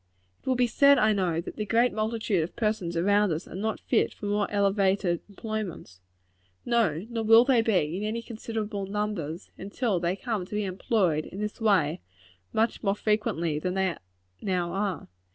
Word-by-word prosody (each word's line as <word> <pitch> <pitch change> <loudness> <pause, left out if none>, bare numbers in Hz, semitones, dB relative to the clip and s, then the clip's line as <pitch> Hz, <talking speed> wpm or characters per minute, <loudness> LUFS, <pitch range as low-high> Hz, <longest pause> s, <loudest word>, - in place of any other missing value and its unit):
It - - -22
will 260 - +2
be 250 0 +3
said, 280 +4 +5
I 215 0 +4
know, 175 -5 0
that - - -9
the 215 - -1
great 235 +3 +3
multitude 215 -3 0
of 165 - -7
persons 210 -6 -1
around 200 +2 +3
us 160 +3 -3
are - - -11
not 215 +4 -2
fit - - +1
for - - -8
more 205 0 0
elevated 195 -3 +1
employments. 200 - -6 0.6
No; 215 -8 +1
nor 230 -1 -3
will 225 +2 +7
they 260 -3 +4
ever 225 - 0
be, 180 -6 +1
in 205 - -4
any 225 +2 -2
considerable 220 -3 -4
numbers, 200 -5 -3
until 200 0 -1
they 175 +2 0
come 215 -2 -3
to 210 - -6
be 210 - 0
employed 185 -4 0
in 195 - -8
this 210 +2 -4
way 190 - +2 0.5
much 225 +1 0
more 200 -1 +1
frequently 170 -8 0
than 180 +3 -2
they 190 -3 +1 0.5
now 180 -3 -1
are. 195 -3 -2
205 Hz, 185 wpm, -27 LUFS, 180-220 Hz, 0.6 s, will